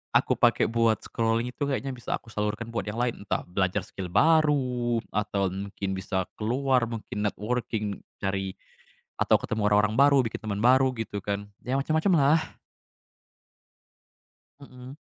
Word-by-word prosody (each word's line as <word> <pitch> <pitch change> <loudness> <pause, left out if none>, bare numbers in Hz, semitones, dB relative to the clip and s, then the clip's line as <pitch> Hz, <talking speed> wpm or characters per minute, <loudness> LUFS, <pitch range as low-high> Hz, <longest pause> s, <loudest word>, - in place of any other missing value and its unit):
aku - - +4
pakai - - +4
buat 115 -1 +3
scrolling 115 +1 -1
itu - - -35
kayaknya 135 0 -2
bisa 120 -2 -3
aku 115 - -17
salurkan 105 +2 -2
buat 115 - -3
yang 105 - -4
lain. 120 -3 -1
Entah - - -1
belajar 90 0 -1
skill 95 -2 -6
baru 130 - +3 0.2
atau 100 -2 0
mungkin 100 0 -5
bisa 95 0 -2 0.2
keluar 125 +2 +1
mungkin 105 -2 -5
networking, 105 -1 -3 0.2
cari 95 -1 -2 0.6
atau - - +4
ketemu 110 0 -3
orang-orang 105 +1 +3
baru, 140 0 +6
bikin - - -6
teman 100 -2 -3
baru 130 +1 +5
gitu 110 -2 -4
kan. 100 0 -3 0.2
Ya, 125 +2 -1
macem-macemlah. 155 0 +2 2.0
Mhm. 130 -1 -12
115 Hz, 140 wpm, -27 LUFS, 105-130 Hz, 2.0 s, baru